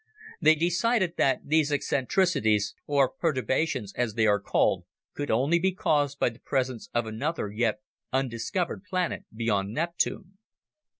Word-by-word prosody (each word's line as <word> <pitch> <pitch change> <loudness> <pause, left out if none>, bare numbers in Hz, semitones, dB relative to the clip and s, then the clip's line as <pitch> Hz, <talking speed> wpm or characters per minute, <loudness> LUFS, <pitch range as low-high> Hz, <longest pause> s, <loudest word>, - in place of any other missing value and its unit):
They 160 - +6
decided 175 +3 +1
that 135 -2 +2
these 155 0 +2
eccentricities 135 - +1
(or 140 -2 +3
perturbations, 130 - -1
as 120 -4 -1
they 110 - +3
are 105 -1 +3
called) 100 - +1 0.3
could 145 - -4
only 140 +9 +3
be 190 +2 +1
caused 145 -6 +1
by - - +2
the 115 +1 -15
presence 130 -3 -2
of 120 -1 0
another, 110 +1 -3
yet 110 0 0 0.3
undiscovered 135 - -2
planet 185 -1 -2
beyond 105 -3 -1
Neptune. 175 - -2
140 Hz, 135 wpm, -27 LUFS, 115-170 Hz, 0.3 s, They